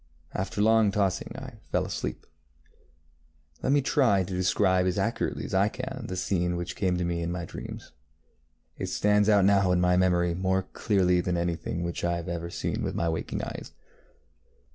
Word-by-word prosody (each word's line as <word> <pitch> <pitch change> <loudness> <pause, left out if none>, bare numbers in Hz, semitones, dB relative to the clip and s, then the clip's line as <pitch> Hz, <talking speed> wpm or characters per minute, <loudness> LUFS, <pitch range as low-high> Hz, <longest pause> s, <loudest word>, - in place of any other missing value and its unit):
After 100 +2 -1
long 110 -1 +5
tossing 100 -2 0
I - - -9
fell - - +1
asleep. - - -4 1.4
Let - - +1
me 145 -1 +3
try 115 -9 +3
to 95 +1 -6
describe 95 0 +2
as 90 - 0
accurately 115 +4 -1
as - - -7
I 95 +2 +3
can 130 +1 -6
the 95 - -4
scene 90 -1 0
which 85 0 -4
came 90 -3 0
to 90 - -1
me 85 0 -1
in 85 0 -2
my 85 -1 -3
dreams. - - -8 0.9
It - - -2
stands 105 0 +2
out 100 -3 +5
now 100 -2 +4
in 90 - +3
my 90 0 +3
memory 90 -1 +2
more 95 +1 0
clearly 90 -2 +1
than 90 0 -1
anything 85 0 -2
which 85 0 -4
I 85 0 +1
have 85 0 -4
seen - - -2
with - - -2
my 85 - 0
waking 80 - -3
eyes. - - -7
95 Hz, 180 wpm, -27 LUFS, 85-100 Hz, 1.4 s, long